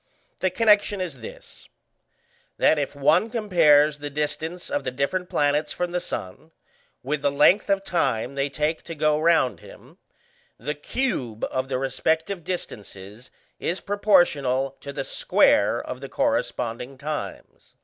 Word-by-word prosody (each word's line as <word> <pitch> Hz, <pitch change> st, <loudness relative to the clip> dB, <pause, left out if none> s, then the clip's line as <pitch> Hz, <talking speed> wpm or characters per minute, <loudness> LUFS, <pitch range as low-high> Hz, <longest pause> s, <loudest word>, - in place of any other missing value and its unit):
The 185 Hz, -, +1 dB
connection 210 Hz, -2 st, +3 dB
is 170 Hz, -8 st, -4 dB
this, 110 Hz, -, -12 dB, 0.9 s
that 155 Hz, -, +4 dB
if 145 Hz, 0 st, -3 dB
one 155 Hz, +10 st, +3 dB
compares 155 Hz, -10 st, +4 dB
the 145 Hz, 0 st, -5 dB
distance 150 Hz, -, -4 dB
of 290 Hz, 0 st, -1 dB
the -, -, -2 dB
different 140 Hz, +8 st, -2 dB
planets 150 Hz, +1 st, +1 dB
from 180 Hz, 0 st, -3 dB
the 180 Hz, -, 0 dB
sun 115 Hz, -, -7 dB, 0.5 s
with 145 Hz, +2 st, -2 dB
the 145 Hz, -, +2 dB
length 150 Hz, +9 st, +4 dB
of 195 Hz, 0 st, +2 dB
time 135 Hz, -9 st, -1 dB
they 140 Hz, +1 st, -1 dB
take 150 Hz, +3 st, -1 dB
to 165 Hz, -, -6 dB
go 150 Hz, 0 st, +2 dB
round 160 Hz, -5 st, +2 dB
him, -, -, -16 dB, 0.6 s
the 150 Hz, -, -3 dB
cube 145 Hz, -, -3 dB
of 130 Hz, +1 st, -2 dB
the 130 Hz, -, 0 dB
respective 160 Hz, +7 st, -1 dB
distances 105 Hz, -, -7 dB, 0.3 s
is 175 Hz, -, -2 dB
proportional 150 Hz, -10 st, +2 dB
to 140 Hz, -, -7 dB
the -, -, -4 dB
square -, -, +3 dB
of -, -, -7 dB
the -, -, -7 dB
corresponding 120 Hz, +3 st, -2 dB
times. 150 Hz, +2 st, -7 dB
150 Hz, 145 wpm, -24 LUFS, 135-180 Hz, 0.9 s, that